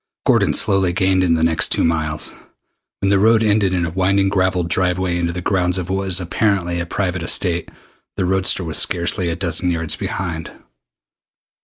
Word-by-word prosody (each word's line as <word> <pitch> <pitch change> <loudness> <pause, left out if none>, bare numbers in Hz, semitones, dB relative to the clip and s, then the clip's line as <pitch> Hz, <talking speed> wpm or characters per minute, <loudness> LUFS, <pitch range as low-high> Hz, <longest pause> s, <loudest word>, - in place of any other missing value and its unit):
Gordon - - +2
slowly 95 -3 +2
gained 95 -1 +2
in 85 -2 +2
the 80 - 0
next 80 0 +3
two - - +1
miles. 80 -2 -1 0.7
When 100 - +1
the 100 - +3
road 110 +2 +4
ended 105 -3 +2
in 90 -2 0
a 85 - -4
winding 95 +2 +1
gravelled 95 -3 0
driveway 90 0 0
into 85 -1 -1
the 90 0 -6
grounds 90 -2 0
of 90 0 -4
what 95 0 -1
was 95 -1 +2
apparently 90 -1 -1
a 85 - -4
private 90 -1 -2
estate, 85 0 0 0.5
the 95 - 0
roadster 95 0 +1
was 80 -2 +1
scarcely 85 +1 +1
a 85 - -2
dozen 85 0 -1
yards 85 -2 -2
behind. 85 -4 -4
90 Hz, 180 wpm, -19 LUFS, 85-95 Hz, 0.7 s, road